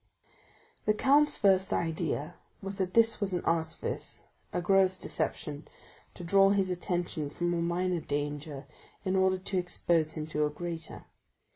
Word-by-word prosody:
'" - - -31
The 215 - +4
count's 285 +6 +4
first 190 -2 +3
idea 165 -1 -1 0.3
was 195 +1 -6
that 185 -1 -2
this 230 -1 +5
was 195 -2 0
an 180 - -2
artifice—a 165 +1 -3
gross 190 +1 +3
deception, 150 -4 -3 0.5
to 180 - -9
draw 195 +3 +5
his 195 -2 +2
attention 175 -4 -2
from 175 +3 -1
a 170 - 0
minor 175 +1 0
danger 145 -1 -4 0.4
in 190 0 0
order 190 0 +3
to 190 0 -2
expose 170 -3 +1
him 155 -1 -4
to 150 -1 -1
a 150 - +2
greater. 165 +1 -6
175 Hz, 150 wpm, -30 LUFS, 160-190 Hz, 0.5 s, this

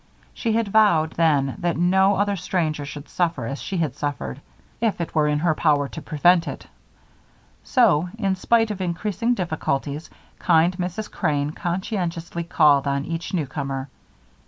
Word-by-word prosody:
She 225 -2 -1
had 225 -2 0
vowed 185 -7 +4
then 145 -5 +1
that 175 -2 -1
no 190 +3 +3
other 205 +1 +1
stranger 165 -5 -2
should 145 0 -8
suffer 165 -8 -1
as 135 +5 -5
she 195 - -4
had 155 -7 -1
suffered, 145 - -4 0.4
if 225 -5 0
it 170 - -4
were 150 -1 +2
in 150 0 +1
her 160 +1 +2
power 145 -3 +2
to 160 - -8
prevent 170 +3 +3
it; - - -6 1.0
so, 180 - +3
in 195 -4 0
spite 225 +3 +2
of 195 -2 -5
increasing 205 +6 -1
difficulties, 155 -4 -3 0.3
kind 170 +1 +3
Mrs. 185 +4 -4
Crane 145 -1 -1
conscientiously 175 -1 -3
called 150 -5 +4
on 140 0 -1
each 165 0 -4
newcomer. 140 -3 -3
170 Hz, 155 wpm, -23 LUFS, 150-190 Hz, 1.0 s, vowed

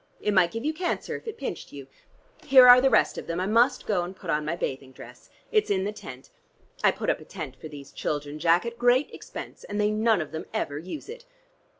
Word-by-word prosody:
It 210 - -1
might 185 -3 +4
give 230 +6 -6
you 310 - 0
cancer 350 +2 -3
if - - -10
it 450 - -5
pinched 265 -10 -6
you. 140 -2 -9 0.6
Here 260 -2 +8
are 250 0 +9
the 270 - +4
rest - - +2
of - - -10
them: 170 +1 -3
I 185 - -1
must 230 +6 +2
go 200 -5 +1
and 175 +2 -6
put 180 -3 -5
on 150 0 0
my 155 +3 -2
bathing 135 -4 -4
dress. - - -14 0.2
It's 430 -2 +2
in 190 -2 +1
the 205 - -2
tent. 130 -10 -11 0.5
I - - +6
put - - -1
up - - -3
a - - -12
tent - - -8
for - - -10
these 145 -2 -11
children, 145 0 -4
Jack, 170 +4 +3
at 235 0 -6
great 245 +3 +3
expense, - - -9
and 205 0 -5
they 210 0 +2
none 220 -1 +2
of 155 - -5
them 160 0 -6
ever 145 0 -2
use 185 - -8
it. 475 +2 -10
200 Hz, 245 wpm, -26 LUFS, 155-245 Hz, 0.6 s, are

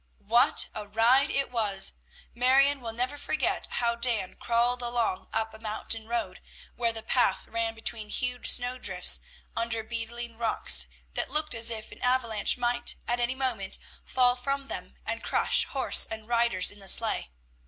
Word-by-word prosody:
What 235 +4 +4
a 210 -1 -6
ride 240 +7 +3
it 275 -2 -1
was! 205 -5 +2 0.4
Marion 270 +3 +3
will 230 -2 -5
never 250 +5 -3
forget - - -1
how 235 -1 +1
Dan 235 -5 -1
crawled 240 +1 0
along 235 -5 -2
up 225 0 -1
a 220 - -11
mountain 220 0 -3
road, 225 -6 -3 0.3
where 235 -1 0
the 225 -1 -9
path 225 -5 +1
ran 230 0 -3
between 225 -1 -4
huge 250 +2 0
snow 250 +1 +2
drifts, - - +4 0.3
under 230 -1 -1
beetling 235 0 -4
rocks 60 - +3 0.3
that - - -3
looked 305 +2 0
as 230 0 +4
if 220 -2 -5
an - - -13
avalanche 245 -4 +1
might 240 0 0
at 240 0 0
any 240 +2 -1
moment 240 -8 -1 0.3
fall 250 -1 +2
from 275 +2 -4
them - - -5
and - - -3
crush - - +3
horse - - +2
and 220 -1 -7
riders 235 -6 +2
in 205 - -12
the 195 -1 -7
sleigh. 225 - +1
235 Hz, 165 wpm, -28 LUFS, 220-250 Hz, 0.4 s, What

